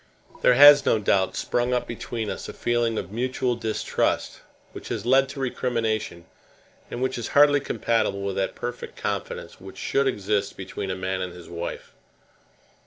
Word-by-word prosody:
There 125 - +5
has 145 +1 +9
no - - +3
doubt 100 -2 +1
sprung 120 +1 0
up 125 - -1
between 115 -2 -4
us - - -6
a - - -7
feeling 120 -1 0
of 90 - -4
mutual 125 +2 -1
distrust, 110 -2 -1 0.3
which - - -9
has 110 -1 -4
led 135 +2 +4
to 140 0 -8
recrimination, 115 -8 -2 0.6
and 120 - -4
which 130 - -1
is 115 - -4
hardly 145 0 +7
compatible 115 -7 -1
with 100 -1 -2
that 95 -1 -1
perfect 120 0 -6
confidence - - -4
which - - -11
should 140 0 +1
exist 105 -4 -1
between 95 0 -5
a 95 - -1
man 95 0 -3
and 90 -1 -4
his 90 -1 -12
wife. 85 0 -6
115 Hz, 170 wpm, -25 LUFS, 100-125 Hz, 0.6 s, has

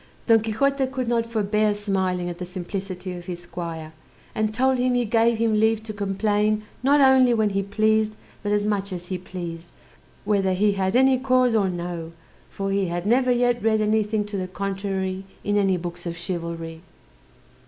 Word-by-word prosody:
Don 225 -1 +6
Quixote 265 +5 0
could 260 -2 -3
not 230 -1 +1
forbear 210 -1 +1
smiling 190 -3 -1
at 175 0 -6
the - - -4
simplicity 185 0 -5
of 175 -1 -8
his 175 -1 -5
squire; 165 -2 -6 0.4
and 215 0 0
told 260 +3 +2
him 250 0 +2
he 245 -1 +1
gave 230 +1 +3
him 225 -1 +1
leave 220 0 +2
to 220 -1 -6
complain 210 +1 0 0.2
not 280 +3 +4
only 260 -2 +6
when 215 -2 +2
he 195 0 0
pleased, 215 +2 +1 0.3
but 205 - -2
as 205 0 +1
much 200 -1 -1
as 180 -1 -6
he 185 -1 -2
pleased, 175 -2 -7 0.5
whether 195 -2 +2
he 205 +3 +3
had 190 0 -1
any 265 0 +5
cause 255 -2 +3
or 205 -4 +2
no; 170 -2 -5 0.4
for 195 0 -3
he 195 -1 +1
had 175 +1 -3
never 250 +4 +3
yet 245 -1 +2
read 220 0 +2
anything 215 0 +1
to 205 -1 -5
the 185 -1 -3
contrary 190 0 -3 0.2
in 205 - 0
any 195 -2 +3
books 175 0 -6
of 170 0 -4
chivalry. 165 -2 -5
205 Hz, 185 wpm, -24 LUFS, 185-225 Hz, 0.5 s, Don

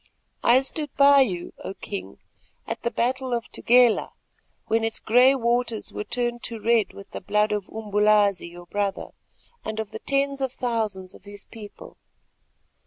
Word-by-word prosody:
I 245 +2 +5
stood 295 +2 -4
by 280 0 +7
you, 180 -9 -1
O 195 - -6
King, 200 -2 -7 0.5
at - - -5
the 235 - 0
battle 255 +2 -1
of 235 - -2
the - - -10
Tugela, 245 -1 +4 0.5
when 225 0 +1
its 225 0 -1
grey 250 +4 +5
waters 235 -2 -1
were - - -4
turned 240 +1 -2
to 230 -2 -5
red 225 -1 +2
with 200 - -12
the - - -6
blood 210 +2 +1
of 210 -2 -3
Umbulazi 210 -3 +2
your 175 +1 -12
brother, 200 +1 -3 0.5
and 220 0 -4
of 220 -1 -4
the 220 - -7
tens 275 +1 -1
of 265 -2 -1
thousands 215 -6 -3
of - - -17
his 205 0 -10
people. 215 -3 -12
225 Hz, 170 wpm, -24 LUFS, 205-245 Hz, 0.5 s, by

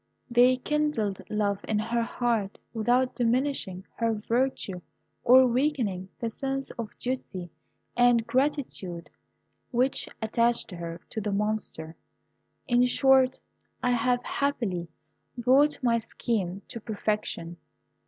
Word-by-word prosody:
They 250 +2 +5
kindled 255 -8 -1
love 205 -2 0
in 215 - +1
her 230 +2 0
heart 230 -4 -1 0.2
without 245 +3 +2
diminishing 240 -6 0
her 230 -1 +1
virtue 220 -4 -1 0.4
or 260 +2 +8
weakening 240 -8 0
the 230 -1 -2
sense 270 +2 -3
of 230 -3 -7
duty 190 -9 -4 0.4
and 245 -2 +4
gratitude 235 - -1 0.6
which 255 +2 +1
attached 235 0 +1
her 170 -1 -6
to 220 - -3
the 210 0 -2
Monster. 200 -6 -2 0.7
In 245 -1 +4
short, 265 0 +4 0.5
I 250 - +3
have 245 +1 +1
happily 205 -12 -1 0.5
brought 265 +5 +4
my 230 -2 +3
scheme 200 -4 -3
to 230 - -5
perfection. 210 -6 -3
230 Hz, 115 wpm, -27 LUFS, 205-255 Hz, 0.7 s, or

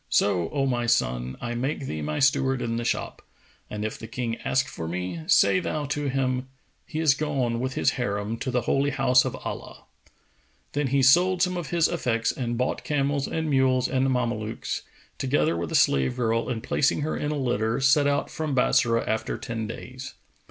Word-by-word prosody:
So, 90 -5 +2
O 135 -1 0
my 120 -3 0
son, 60 - 0
I 120 0 -3
make 135 +4 -2
thee 80 -10 -4
my 75 0 -3
steward 135 -2 +2
in 115 0 -2
the 120 - -2
shop, 115 - -2 0.5
and 105 0 -4
if 110 - -4
the 110 - -8
King 115 -2 -3
ask 130 0 0
for 80 - -6
me, 90 - -3
say 185 - +5
thou 155 -4 -2
to 145 0 -2
him, 130 -1 -1 0.4
'He 155 - -4
is 155 -3 +5
gone 135 -5 -1
with 130 +1 -3
his - - +2
Harim 105 -3 -2
to 130 - -3
the 125 -1 +1
Holy 140 +3 +1
House 125 -2 +3
of - - -3
Allah.'"[FN#454] - - -7 0.9
Then 145 -1 0
he 135 +1 +2
sold 175 +7 +5
some 180 -1 0
of 175 -3 -4
his 170 -2 +3
effects 115 -9 0
and 120 -2 -3
bought 125 - -1
camels 140 -1 0
and 160 -1 -2
mules 130 -3 +3
and 135 0 +1
Mamelukes, 115 -4 -2 0.4
together 135 -9 +1
with 85 -1 -3
a - - -1
slave 70 - +3
girl,[FN#455] 115 0 0
and 115 -1 -4
placing 140 - +1
her 155 +2 -1
in 145 - -2
a 150 - -2
litter, 115 -3 0
set 140 +2 +4
out 145 0 0
from 155 -3 -2
Bassorah 115 -2 +2
after 110 - -1
ten 115 -3 -4
days. 130 +3 -8
130 Hz, 195 wpm, -26 LUFS, 115-140 Hz, 0.9 s, say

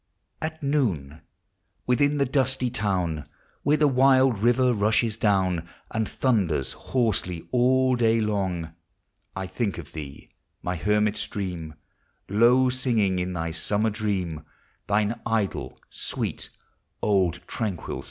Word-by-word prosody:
At 155 -1 -4
noon, 95 - 0 0.6
within 145 +4 +2
the 140 - +3
dusty 130 -2 +1
town, 90 - -1 0.4
Where 150 +1 +3
the 150 - +4
wild 130 -3 +4
river 120 +3 +3
rushes 110 +1 +2
down, 95 -6 +1 0.2
And 110 -2 -1
thunders 95 - +1
hoaraely 105 -9 -1
all 130 +1 +3
daj 115 -2 +2
long, 95 -6 -2 0.6
1 95 0 -4
think 105 -7 -2
of 80 -5 -9
thee, 75 -3 -8 0.3
my 90 - -1
hennil 105 +4 +1
stream, 90 -6 -4 0.5
Low 120 +5 +4
singing 115 -8 +1
in 90 0 -2
thv 80 -1 -3
summer 105 +5 0
dream 95 -7 -2 0.4
Thine 105 +3 +1
idle, 110 -4 -2
sweet, - - -4 0.5
old, 90 -5 +2
tranquil 105 -6 -3
BOOg. - - -6
105 Hz, 125 wpm, -25 LUFS, 90-125 Hz, 0.6 s, the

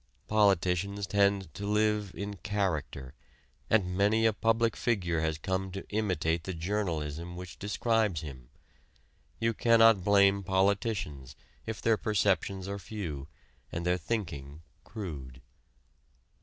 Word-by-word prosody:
Politicians 100 -1 +2
tend 100 -4 +1
to 100 +4 -5
live 105 -1 +1
"in 100 0 -5
character," 80 -11 -2 0.6
and 90 -5 +2
many 105 +4 +3
a 110 - +4
public 115 +1 +1
figure 90 -8 0
has 80 -1 0
come 95 +3 -2
to 95 - -6
imitate 90 -6 0
the 95 - -4
journalism 85 -3 -3
which 90 -1 -9
describes 105 -4 +1
him. 65 -6 -9 0.9
You 115 0 +1
cannot 115 -3 +5
blame 100 0 +5
politicians 95 - 0 0.3
if 110 -2 -5
their 115 -1 +4
perceptions 95 -3 0
are 100 0 -4
few 85 -9 -6 0.4
and 85 +1 -4
their 90 0 +2
thinking 80 -7 -4 0.2
crude. 70 - -7
95 Hz, 120 wpm, -30 LUFS, 85-105 Hz, 0.9 s, cannot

